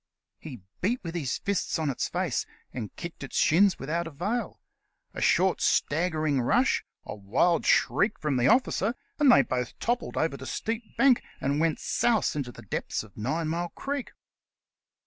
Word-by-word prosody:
He 125 - -9 0.2
beat 235 +7 +1
with 165 -2 -5
his 150 -7 -2
fists 200 -3 -1
on 155 -3 0
its 130 - -2
face, - - -1 0.3
and 110 -5 -6
kicked 170 0 -8
its 135 - -5
shins 185 +4 +4
without 165 +5 -2
avail. 195 - -3 0.5
A - - -6
short, - - +3
staggering 155 -3 +1
rush, 245 - +2 0.2
a - - -5
wild 115 - +1
shriek 210 +2 +3
from 150 -4 -1
the 120 - +3
officer, 235 -2 +2 0.2
and 290 -3 +6
they - - +7
both 125 -1 -3
toppled 240 +1 -2
over 160 -3 0
the 130 - -8
steep 225 - -4
bank 270 -3 +5 0.2
and 140 +2 0
went 160 -1 +1
souse 230 -9 +1
into 135 -4 -3
the 115 - -13
depths 105 - -3
of 105 -3 -17
Ninemile 160 +8 -2
Creek. 280 -2 -4
165 Hz, 165 wpm, -27 LUFS, 135-210 Hz, 0.5 s, they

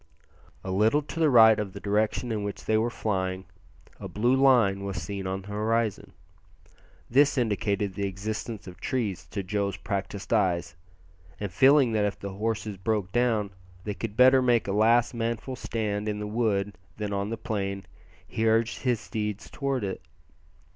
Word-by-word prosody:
A 95 - -4
little 110 +10 +3
to 150 +3 -7
the 160 -2 +4
right 110 -4 +7
of 100 -3 -4
the 100 - -7
direction 105 +4 0
in 105 -2 -2
which 100 0 -5
they 110 - +2
were 110 +2 +2
flying 95 -4 -2 0.5
a - - -6
blue 120 +5 +1
line 120 -8 +4
was 100 -2 -3
seen 95 +3 -5
on 95 +1 -3
the 100 - -12
horizon. 110 +1 -1 0.9
This 140 +3 +4
indicated 105 -4 0
the 100 +1 -2
existence 105 +3 -5
of 90 -1 -11
trees 110 -8 -2
to 100 - -4
Joe's 100 0 -2
practised 100 +1 -4
eyes, 85 -6 +1 0.6
and 100 -3 -4
feeling 135 - +5
that 110 -2 +1
if 100 - -2
the 100 -1 -6
horses 105 0 -3
broke 100 -1 -1
down 115 -4 +1 0.3
they 105 - -3
could 105 +1 -6
better 130 +1 +7
make 120 -4 +2
a - - -1
last 115 +4 +3
manful 115 +2 -3
stand 105 -3 -2
in 105 - -2
the 105 - -4
wood 105 -3 -1 0.2
than 105 -1 -3
on 100 +1 -2
the 115 - -3
plain 100 -3 -3 0.4
he 115 0 -1
urged 115 +1 +1
his 125 -4 +1
steed 105 -2 -3
towards 135 -1 -3
it. 95 - -4
105 Hz, 175 wpm, -27 LUFS, 100-115 Hz, 0.9 s, right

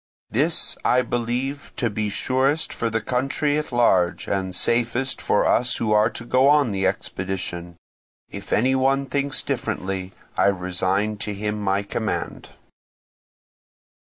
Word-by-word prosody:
This 155 +8 +1
I 125 0 +3
believe 125 +4 -3
to 120 - 0
be 105 0 -1
surest 135 +8 0
for 115 - -1
the 115 0 -1
country 135 +5 0
at 150 - -6
large, 95 -8 +2
and 95 -2 -2
safest 120 +5 0
for - - +2
us 125 +1 +3
who 110 - -1
are 105 +1 +4
to 115 0 -7
go 130 +3 +4
on 145 -5 +4
the 95 -1 +1
expedition. 90 -2 -4 0.5
If - - -9
any 130 +5 +3
one 135 +1 +2
thinks 140 +1 -1
differently 95 0 -3 0.2
I - - +3
resign 95 +2 0
to 105 0 -4
him 105 +1 -3
my 100 0 +1
command." 100 - -3
115 Hz, 140 wpm, -23 LUFS, 95-130 Hz, 0.5 s, are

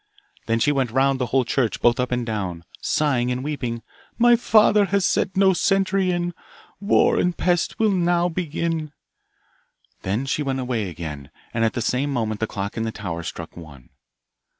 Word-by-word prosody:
Then 115 0 +2
she 145 - +3
went 135 -4 0
round 135 +2 +2
the 125 - -1
whole 130 +2 +1
church, 120 -1 0
both 120 +2 +3
up 125 0 -1
and 125 -1 -1
down, 95 -7 -4 0.2
sighing 130 -5 +1
and 125 +1 -3
weeping, 125 -6 -4 0.3
My 240 0 +6
father 215 -3 +4
has 195 0 +1
set 190 0 0
no 190 -1 +5
sentry 195 +1 +1
in, 175 0 -1 0.5
War 200 +2 +3
and 180 -1 0
Pest 175 -2 0
will 220 -2 +3
now 175 -1 +2
begin. 165 -2 -3 1.1
Then 105 +8 -2
she 135 +3 -1
went 135 -2 -1
away 120 -6 -2
again, 75 -4 -7 0.2
and 115 - 0
at 115 - +1
the 120 - -2
same 135 +4 0
moment 110 -5 -2
the 110 - -1
clock 100 +1 -5
in - - -1
the 115 - -2
tower 90 -6 -5
struck 85 -1 -7
one. 75 -7 -13
130 Hz, 180 wpm, -23 LUFS, 110-175 Hz, 1.1 s, My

